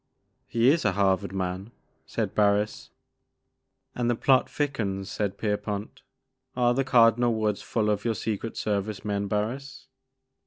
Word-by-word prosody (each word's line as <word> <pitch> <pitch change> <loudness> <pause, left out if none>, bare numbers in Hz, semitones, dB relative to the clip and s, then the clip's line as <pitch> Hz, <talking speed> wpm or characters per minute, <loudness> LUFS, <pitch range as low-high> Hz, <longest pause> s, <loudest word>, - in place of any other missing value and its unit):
He 115 +3 +3
is 160 +2 +1
a 105 - +2
Harvard 95 -3 +1
man," 95 +1 -3 0.4
said - - -2
Barris. 105 0 +1 1.0
And 120 -1 -1
the 120 - +2
plot 130 +2 +3
thickens," 100 -10 -2
said 100 -2 -2
Pierpont; 105 -1 -3 0.3
" 130 0 -50
are 120 -1 +3
the 135 +2 +1
Cardinal 120 -2 +4
Woods 105 -2 0
full 110 -2 -1
of 105 0 -1
your 115 -2 0
Secret 110 +2 -4
Service 105 0 -2
men, 100 -1 -1
Barris?" 125 +8 -3
105 Hz, 145 wpm, -26 LUFS, 100-120 Hz, 1.0 s, Cardinal